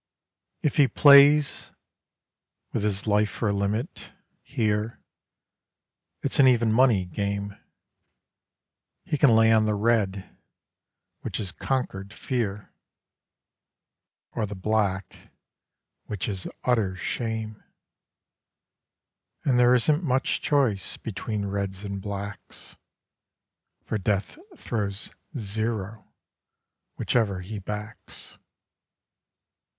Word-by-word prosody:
If 150 - 0
he 145 -3 +6
plays 140 +1 +6 1.0
with - - 0
his 100 -1 0
life 105 0 +2
for 110 - -2
a - - +1
limit 105 - -3 0.3
here, 110 -4 -1 1.2
It's - - -1
an 135 - +8
even 115 -3 +3
money 115 -6 +4
game: 100 +2 -3 1.5
He - - -1
can 145 - +6
lay 115 0 +5
on 110 -1 +4
the 105 - +1
Red 100 -3 0 0.8
which - - -4
is 95 -4 -3
Conquered 105 -7 -3
Fear, 110 -8 -3 1.6
Or 110 -3 -2
the 100 - -6
Black 95 -1 -2 0.8
which 105 -4 -3
is 95 -3 -3 0.2
Utter 110 -7 +1
Shame. 110 +2 -4 1.8
(And 125 -3 +3
there 125 +1 +6
isn't 150 +7 +2
much 130 -3 0
choice 130 -10 0
between 105 -1 -4
Reds 100 -1 -3
and 100 -1 -5
Blacks, 100 0 -7 1.1
For 110 - -2
Death 100 - -1 0.2
throws 100 -3 -3 0.3
"zero" 110 -1 -3 0.9
whichever 100 -6 0
he 105 +3 -6
backs.) 105 +2 -8
105 Hz, 95 wpm, -26 LUFS, 100-120 Hz, 1.8 s, an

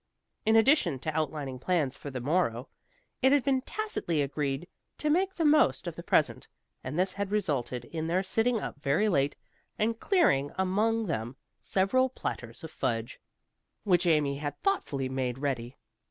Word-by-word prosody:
In 220 - +5
addition 225 - +4
to 155 +1 -3
outlining 145 -4 -2
plans 150 -4 0
for 145 - -8
the 130 -2 -5
morrow, 130 -3 0 0.5
it 265 0 +5
had 285 -2 +4
been 265 -1 +2
tacitly 255 - -2
agreed 140 +2 -2 0.3
to 300 - 0
make 380 +4 +1
the 330 - 0
most 300 +1 +4
of - - -4
the - - -7
present, - - +1 0.4
and 150 - -4
this 185 +1 +1
had 200 -1 -3
resulted 140 - -1
in 160 +4 -4
their 180 +3 +1
sitting 225 +4 +1
up 145 - -6
very 150 +10 +2
late 145 -7 +1 0.4
and 225 +1 0
clearing 145 - +3
among 215 +4 +1
them 120 - -3 0.3
several 255 +8 +2
platters 115 - -5
of 160 - -7
fudge, 115 -3 -2 0.6
which 180 -3 +3
Amy 150 -4 +2
had 145 0 -5
thoughtfully 145 - 0
made 130 -1 -2
ready. 130 -3 -3
165 Hz, 165 wpm, -29 LUFS, 135-225 Hz, 0.6 s, In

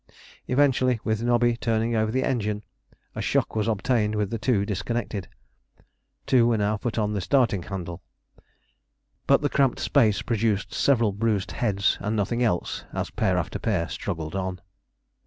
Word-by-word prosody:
Eventually, 130 -2 +2
with 110 0 -1
Nobby 120 0 +2
turning 115 0 0
over 110 0 +1
the 130 +2 0
engine, 105 -4 -1 0.5
a - - -4
shock - - 0
was 110 0 0
obtained 110 0 +1
with 105 -2 -1
the 115 - -2
two 105 -4 +1
disconnected. 105 -1 -3 1.0
Two 120 -3 +4
were 115 -2 +2
now 105 +1 +1
put 120 +2 -4
on 105 -2 +1
to - - -3
the 100 - -1
starting 115 -4 +2
handle. 90 -1 -6 1.3
But - - +5
the - - +2
cramped 135 -3 +2
space 110 -8 +2
produced 110 -3 0
several 120 -6 +3
bruised 105 -1 -1
heads 100 -3 0
and 105 +2 -1
nothing 110 +4 0
else 105 -8 0
as - - -3
pair - - +1
after - - -2
pair 90 -7 0
struggled 80 -1 -4
on. 95 -1 -3
110 Hz, 160 wpm, -25 LUFS, 100-120 Hz, 1.3 s, But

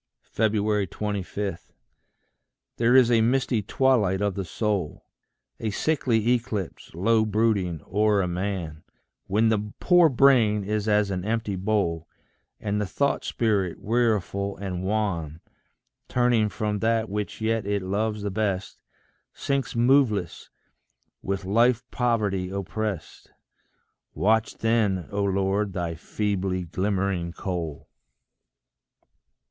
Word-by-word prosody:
25. 105 -3 -1 1.2
There 120 +2 +3
is 125 -2 +6
a 115 -1 +4
misty 125 -1 +1
twilight 105 -4 +2
of 100 -1 0
the 95 - -3
soul, 100 -3 -2 0.5
A 110 - -2
sickly 120 -2 +1
eclipse, 110 -10 -3
low 110 +5 +3
brooding 105 -7 0
o'er 105 0 +2
a - - -1
man, 90 -4 -3 0.5
When 110 +3 +3
the 105 -1 -1
poor 175 -3 +5
brain 120 -6 +4
is 105 +1 -2
as 105 -1 +2
an 90 -2 -2
empty 110 -1 -1
bowl, 90 -5 -1 0.5
And 105 0 -1
the 105 - -2
thought 140 +8 0
spirit, 100 -7 0
weariful 105 -3 0
and 95 -3 -4
wan, 95 -7 -2 0.7
Turning 120 -3 +2
from 105 0 -2
that 115 0 +1
which 105 0 -4
yet 110 -1 -1
it 100 -1 -1
loves 105 +2 -1
the 100 - -2
best, 100 -2 -2 0.6
Sinks 140 -4 -2
moveless, 120 - +2 0.7
with 95 0 -3
life 120 +5 +3
poverty 105 -7 0
opprest: 100 -2 -4 0.9
Watch 110 +2 +1
then, 110 -6 +1
O 100 0 -1
Lord, 100 +1 0
thy 85 -2 -2
feebly 95 +1 -2
glimmering 95 -1 -1
coal. 85 -7 -5
105 Hz, 115 wpm, -25 LUFS, 95-115 Hz, 1.2 s, is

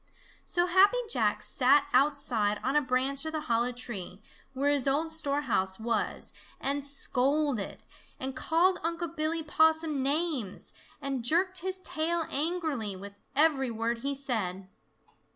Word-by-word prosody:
So 350 0 +2
Happy 380 +6 +5
Jack - - +1
sat 280 +2 +3
outside 255 -7 +2
on 265 +3 0
a 295 - +5
branch 265 +1 0
of 315 - -4
the 310 - -2
hollow 240 -3 0
tree 205 -6 -6 0.3
where 280 +2 +1
his 280 -2 +1
old 305 +4 +1
storehouse 280 -11 0
was 230 0 -2 0.3
and 280 +1 -1
scolded, 280 -3 0 0.4
and 265 0 -4
called 360 +3 +2
Unc' 335 0 -3
Billy 320 +1 -1
Possum 315 -1 +2
names, 280 - -1 0.3
and 270 -3 -2
jerked 365 +8 +2
his 375 +1 0
tail 330 0 -1
angrily 295 - -1
with 200 +2 -9 0.2
every 285 -3 +3
word 230 +1 -2
he 280 +3 -2
said. 205 -9 -3
280 Hz, 135 wpm, -29 LUFS, 245-320 Hz, 0.4 s, Happy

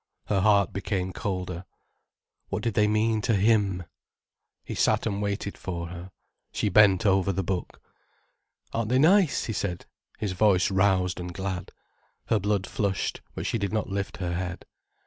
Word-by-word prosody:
Her 100 -2 +1
heart 100 -1 +3
became 95 -2 -2
colder. 90 -2 -3 0.9
What - - -3
did 115 - 0
they 105 0 +3
mean 110 +1 +2
to 115 +1 +1
him? 100 -3 +2 0.8
He - - -6
sat - - +2
and 100 0 -1
waited 100 0 -3
for 85 -2 -4
her. 90 +1 -8 0.4
She 105 - 0
bent 100 0 +5
over 95 -1 +3
the 95 +1 -1
book. 90 0 -3 0.9
"Aren't 115 -1 -1
they 125 - +3
nice?" 170 +3 +4
he 110 - -3
said, 90 -4 -3 0.3
his 105 -3 -2
voice 95 0 +3
roused 95 -2 +2
and 90 0 -5
glad. 95 0 -4 0.6
Her 110 - +3
blood 100 -1 0
flushed, 100 -1 -2
but - - -4
she 115 - 0
did 100 -2 -2
not 110 -1 -1
lift 100 0 -3
her 90 -2 -3
head. 90 0 -4
100 Hz, 165 wpm, -27 LUFS, 90-105 Hz, 0.9 s, bent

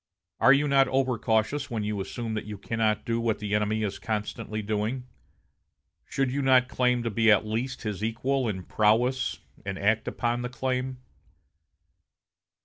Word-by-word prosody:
Are 135 - +6
you 140 +2 +4
not 135 -1 +4
over 130 -3 +1
cautious 110 +6 0
when 110 -3 -2
you 105 -1 -2
assume 110 +3 -4
that 110 - -3
you 105 -1 -6
cannot 110 +1 0
do 115 0 0
what 115 -2 0
the 105 -1 -4
enemy 105 +1 +1
is 100 - -3
constantly 110 0 -3
doing? 110 +5 -2 1.0
Should 135 -2 -1
you 140 +2 -1
not 130 -2 +5
claim 125 -1 +1
to 115 - -2
be 115 +2 +3
at 105 0 +5
least 120 +5 -3
his 105 -2 -3
equal 125 +4 0
in 95 -3 -4
prowess, 115 +3 +1 0.2
and 95 -1 -4
act 105 +3 +1
upon 120 0 -1
the 125 - -3
claim?... 130 +1 -2
115 Hz, 165 wpm, -27 LUFS, 105-130 Hz, 1.0 s, Are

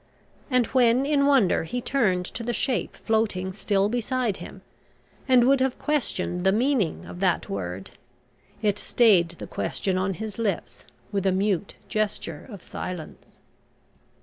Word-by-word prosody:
And 250 -3 +3
when 250 +1 +3
in 280 -1 +3
wonder 260 -14 +4
he 245 +10 -3
turned 210 -9 +1
to 230 - -5
the 240 +1 -2
shape 250 +2 -1
floating 210 -4 0
still 200 0 +1
beside 240 -1 -1
him, - - -10 0.6
and 255 -2 +6
would 275 +1 +4
have 260 -1 0
questioned 185 - -1
the 190 - +4
meaning 230 - +1
of 175 - -9
that 185 -3 +1
word, 95 -1 -5 0.7
it 205 -1 +2
stayed 200 -8 +4
the - - -7
question 185 -2 -2
on 185 0 -1
his 220 +1 -6
lips 205 -6 -3 0.2
with 195 -2 0
a - - +4
mute 195 0 0
gesture 205 -7 -2
of 200 -6 -10
silence. 180 -4 -8
210 Hz, 150 wpm, -25 LUFS, 185-245 Hz, 0.7 s, and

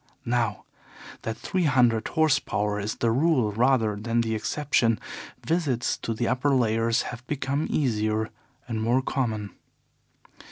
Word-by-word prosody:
Now 115 -4 0 0.6
that 115 0 -4
three 185 -2 -1
hundred 120 -6 +3
horse 155 -4 +3
power 105 0 -1
is 105 +1 -3
the 115 - +1
rule 130 -4 +2
rather 115 -1 +2
than 115 +3 0
the 115 -1 -1
exception, 115 +1 +1 0.5
visits 150 -8 0
to 115 - -3
the 120 +1 -1
upper 130 +3 +2
layers 115 -1 +2
have 120 +1 -9
become 140 +1 -1
easier 110 -5 0 0.4
and 110 -2 -2
more 120 +4 +2
common. 110 -7 -2
115 Hz, 135 wpm, -26 LUFS, 110-135 Hz, 0.6 s, hundred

